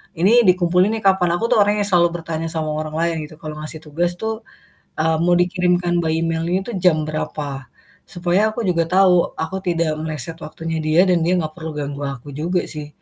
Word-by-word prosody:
"Ini 215 +7 +4
dikumpulin 180 +1 +3
nih 220 - -6
kapan?" 190 -2 +4
Aku 230 - -1
tuh - - +5
orangnya 205 0 +2
selalu 175 -2 +4
bertanya 165 0 -3
sama 160 -1 -3
orang 155 0 -4
lain 170 0 +1
gitu 155 - -14
kalau 155 -1 -6
ngasih 155 +1 -6
tugas 170 +4 -1
tuh, 220 0 -1 0.7
eee, 160 0 +2
mau 175 0 +4
dikirimkan 180 0 +1
by - - -1
email 165 0 -1
itu 190 +6 -1
jam 155 -4 +4
berapa. 145 -3 -4 0.4
Supaya 180 +4 +1
aku 235 - -4
juga 170 -2 +2
tahu 180 -1 +3
aku 185 +4 -3
tidak 170 -2 +1
meleset 160 +1 -4
waktunya 165 +1 -4
dia 155 +4 +4
dan 180 - +3
dia 175 - +2
nggak 155 -2 -3
perlu 160 -1 -5
ganggu 145 0 -4
aku 140 +1 -7
juga 170 +6 -1
sih 150 -2 -6
170 Hz, 195 wpm, -20 LUFS, 155-180 Hz, 0.7 s, tuh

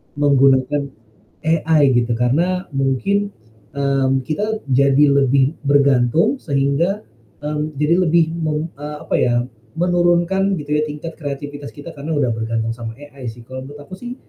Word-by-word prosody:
menggunakan 140 0 +3 0.5
AI 155 -3 +3
gitu. 120 0 +1
Karena 170 +11 0
mungkin, 150 +10 0 0.4
mmm, 135 -1 +1
kita 215 +7 -1
jadi 140 +2 +4
lebih 140 +1 +3
bergantung 140 - +3
sehingga, 145 - 0 0.4
mmm, 150 0 -3
jadi 150 +3 +3
lebih 165 0 +4
mem 155 0 -2
eee, 150 +1 -7
apa - - -1
ya, 120 -1 +2 0.4
menurunkan 175 +3 +2
gitu 145 - -11
ya 150 +1 +1
tingkat 150 +3 -7
kreativitas 145 -1 -6
kita 145 +3 -9
karena 150 +2 -5
udah 135 -5 +1
bergantung 115 0 -2
sama 115 -1 -6
AI 140 -1 -11
sih. 115 +1 -7
Kalau 130 +2 -9
menurut 145 +1 -11
aku 185 +5 -11
sih 245 0 -6
145 Hz, 145 wpm, -19 LUFS, 135-165 Hz, 0.5 s, jadi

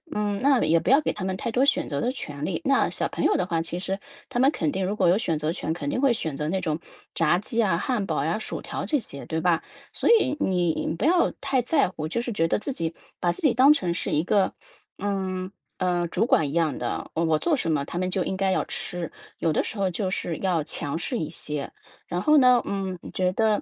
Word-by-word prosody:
嗯， 205 -1 0
那 275 -2 +4
也 165 +1 +4
不 - - -2
要 275 +4 +6
给 - - 0
他 190 - -5
们 190 0 -1
太 230 - -3
多 250 +4 +3
选 280 - +1
择 140 - -2
的 245 - 0
权 145 - -5
利， - - -2
那 275 -2 +3
小 - - -1
朋 - - -2
友 - - +4
的 - - +1
话， 165 -3 0
其 170 +1 -4
实 195 +2 -3 0.3
他 245 - -2
们 265 +2 +6
肯 160 - -1
定 190 +3 -1
如 200 +3 -1
果 185 -4 +3
有 180 - +4
选 165 -8 0
择 155 +1 -1
权， 165 -2 -2
肯 150 -4 -4
定 250 - -1
会 270 -2 +4
选 160 -10 -3
择 150 - -2
那 190 +4 -1
种 160 -2 -1 0.3
炸 165 +1 +3
鸡 225 +4 -1
啊、 190 -6 +2
汉 210 +4 -1
堡 - - -1
呀、 - - 0
薯 - - -5
条 - - -4
这 300 - +2
些， 140 -9 -6
对 160 0 -2
吧？ 170 -1 +2 0.3
所 - - -2
以 355 - +4
你 175 -3 0
不 - - -4
要 345 +4 +4
太 275 -2 +1
在 275 - +2
乎， - - -17
我 - - -1
就 235 +9 -1
是 240 - -4
觉 165 -6 +1
得 - - +1
自 215 +6 -4
己 165 -10 -3 0.2
把 175 -1 +1
自 - - -7
己 290 -7 +4
当 270 +4 +7
成 180 - -1
是 170 - -3
一 150 - +2
个， 195 +2 +2 0.4
嗯， 190 -2 -2 0.3
呃， 175 -2 0
主 180 - +1
管 160 -9 +3
一 - - -6
样 165 -3 +1
的， - - -4
我 165 +1 0
我 160 -1 +3
做 320 - 0
什 170 - -2
么 150 -3 +1
他 170 - -6
们 185 +1 0
就 185 0 0
应 190 - -3
该 190 0 +1
要 - - +1
吃。 175 -2 -5 0.3
有 165 - +1
的 - - +2
时 - - -6
候 195 -1 +1
就 185 +2 -2
是 175 -3 -2
要 180 -5 0
强 145 -1 -3
势 235 +8 -2
一 155 - -3
些， 150 -3 -3 0.4
然 175 +1 -2
后 300 +9 +5
呢， 250 -3 +6
嗯， 190 -2 -3
我 - - -9
觉 185 0 0
得 215 0 +2
185 Hz, 285 characters per minute, -25 LUFS, 165-230 Hz, 0.4 s, 当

